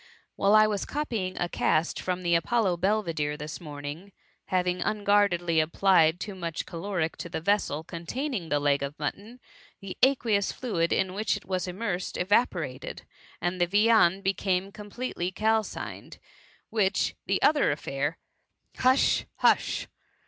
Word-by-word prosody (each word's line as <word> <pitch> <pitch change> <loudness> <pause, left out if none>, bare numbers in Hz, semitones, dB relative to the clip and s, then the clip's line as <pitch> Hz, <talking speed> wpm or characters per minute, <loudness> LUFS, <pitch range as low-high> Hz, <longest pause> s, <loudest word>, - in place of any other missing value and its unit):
" - - -39
Whilst 205 +2 +5
I 215 - +6
was 210 -2 -1
copying 230 -11 -3
a 175 - 0
cast 165 -1 0
from 185 0 -2
the 170 -1 +1
Apollo 185 +2 +2
Belvidere 170 -6 0
this 150 +3 -7
morning, 150 +4 -7 0.3
having 180 -1 0
un 210 -1 -1
guardedly 175 -5 +3
applied 165 0 +3
too 200 +3 -5
much 170 -4 -4
caloric 170 -1 -3
to 170 - -6
the 170 - -3
vessel 165 -4 0
containing 185 - -4
the 145 - +2
leg 145 -1 +2
of 140 +2 -4
mutton, 205 +11 -5 0.4
the 195 -1 -7
aqueous 230 -6 +3
fluid 180 -10 -1
in 190 -1 +1
which 215 +3 0
it - - -13
was 185 -1 -2
immersed, 185 -1 -3
evaporated, 180 - 0 0.4
and 175 +1 -2
the 175 - +4
viand 205 -1 +4
became 195 0 0
completely 205 -3 -4
calcined; 220 +2 -2 0.5
whilst 205 -3 +1
the - - +1
other 295 -1 +4
affair 145 +1 -2 0.2
— - - -46
"" - - -53
" - - -27
Hush, 260 +1 +3
hush - - +2
185 Hz, 155 wpm, -27 LUFS, 165-210 Hz, 0.5 s, I